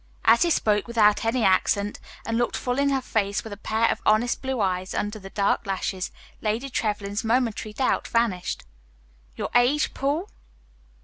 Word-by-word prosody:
As 230 - +6
he 345 - +4
spoke 210 -9 +1
without 220 -2 +3
any 230 +1 +1
accent, 200 +1 +2 0.3
and 225 - -1
looked 240 +1 0
full 250 +1 -2
in 280 0 +3
her 270 -1 +1
face 200 -4 -1
with 220 - -7
a - - -5
pair 220 +3 +1
of - - -3
honest 220 +3 +2
blue 265 -2 -2
eyes 185 -2 -1
under 210 +1 -2
the 195 -1 -10
dark 200 0 0
lashes, 190 -1 -2 0.3
Lady 230 +5 -2
Trevlyn's 205 -2 -2
momentary 225 -2 0
doubt 255 +4 0
vanished. 225 -6 0 0.7
"Your - - -3
age, 250 +5 +3
Paul?" 290 +8 -1
220 Hz, 170 wpm, -25 LUFS, 205-245 Hz, 0.7 s, As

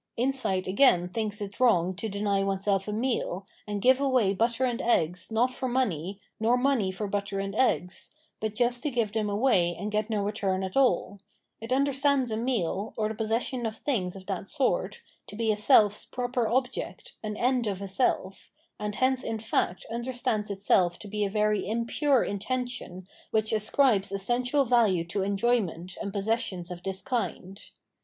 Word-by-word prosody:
Insight 245 -7 0
again 185 -4 +4
thinks 210 +1 -3
it 200 0 -6
wrong 185 -8 +3
to 220 - -3
deny 200 0 0
one 195 0 0
seH 195 0 0
a - - -2
meal, 215 -4 -1 0.2
and 205 -1 -3
give 260 +2 +5
away 255 -8 +3
butter 235 +5 +1
and 240 -2 -1
eggs 180 -4 0
not 245 +3 +2
for 260 - -3
money, 195 - -1 0.2
nor 230 +3 +3
money 250 -7 +1
for 200 +3 -4
butter 200 0 -2
and 195 0 -3
eggs, 200 -6 0 0.3
but 215 -1 -3
just 245 0 +1
to 300 - -1
give 235 -5 0
them 215 -1 -1
away 200 -6 +2
and 210 +1 -5
get 215 +1 -1
no 210 -2 0
return 195 -2 -1
at 190 0 -5
aU; 250 -6 +2 0.4
it 225 +2 -8
understands 275 -1 +2
a - - 0
meal, 220 -4 -1
or 215 -1 0
the - - -3
possession 225 +2 -1
of 220 0 -6
things 200 -11 -2
of 190 -1 -10
that 195 -1 -4
sort, 270 +1 -1 0.2
to - - -10
be 220 0 +1
a - - +1
self's 210 -1 +4
proper 245 -2 -2
object, 250 +2 -2
an 215 -1 -4
end 250 -1 +1
of 195 -2 -2
a 200 - -5
self, 195 -2 -1 0.3
and 210 -1 -3
hence 260 +1 +1
in 225 - -2
fact 215 -4 -1
understands 235 -3 -1
itself 190 -3 +2
to 210 - -10
be 210 +1 -2
a 200 - 0
very 210 -1 +1
impure 235 +4 +2
intention 245 -3 -4 0.2
which 220 0 0
ascribes 215 -2 +2
essential 245 +8 +2
value 225 -8 +3
to 195 +4 -2
enjoyment 195 -4 0
and 200 - -3
possessions 200 -3 -2
of 175 -1 -7
this 190 +1 -3
kind. 220 -6 -3
215 Hz, 180 wpm, -28 LUFS, 195-245 Hz, 0.4 s, give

